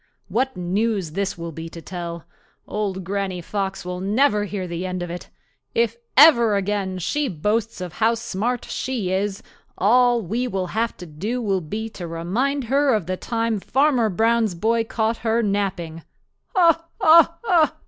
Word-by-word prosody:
What 255 +6 0
news 190 0 -1
this 195 +3 -2
will 170 0 -5
be 165 +1 -7
to 165 - -9
tell! 170 -1 -6 0.4
Old 195 -3 -3
Granny 190 0 -2
Fox 190 +1 -3
will 180 0 -4
never 210 +2 +2
hear 200 -2 -4
the 170 +1 -4
end 185 -1 -3
of 175 - -5
it. 175 - -7 0.5
If 230 -1 +2 0.2
ever 235 -8 +7
again 195 -1 -1
she 290 - -1
boasts 210 +4 -1
of 180 -3 -5
how 225 +1 +2
smart 230 +2 -2
she 235 -8 -3
is, 195 +1 -1 0.3
all 240 +3 +4
we 230 +8 -1
will 190 -5 -2
have 230 +2 -1
to 180 - -8
do 190 +11 -4
will 195 -5 0
be 210 +8 -4
to 180 -5 -7
remind 220 +13 -1
her 270 +1 +2
of 210 -6 -1
the 185 +2 -2
time 230 +1 -1
Farmer 260 0 +2
Brown's 225 0 +2
boy 225 +5 +1
caught 225 0 -1
her 230 +1 0
napping. 190 -5 -2 0.5
Ho! 340 -4 +5 0.2
ho! 335 +1 +5
210 Hz, 165 wpm, -22 LUFS, 185-235 Hz, 0.5 s, ever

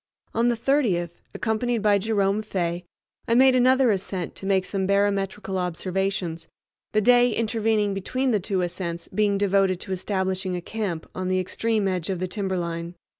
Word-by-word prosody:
On 230 +1 +2
the 240 -1 +1
30th, 225 - +1 0.2
accompanied 225 0 -1
by 205 -1 +4
Jerome 200 -1 +1
Fay, 175 -4 -2 0.4
I 230 - +3
made 260 +1 +6
another 255 0 +4
ascent 190 -3 -3
to 195 - -6
make 190 -2 +2
some 190 -1 -2
barometrical 200 -1 0
observations, 180 -1 -2 0.4
the 215 - +2
day 245 +2 +5
intervening 220 -2 +1
between 255 +7 -1
the 215 - +2
two 190 0 -1
ascents 170 -1 -4
being 205 -2 +1
devoted 195 -2 +2
to - - -6
establishing 190 0 -1
a - - -2
camp 190 -5 -4
on 185 0 -3
the 185 0 +1
extreme 215 +3 0
edge 180 -2 -2
of 190 - -1
the 185 +1 -2
timberline. 175 -3 -3
195 Hz, 165 wpm, -25 LUFS, 185-220 Hz, 0.4 s, made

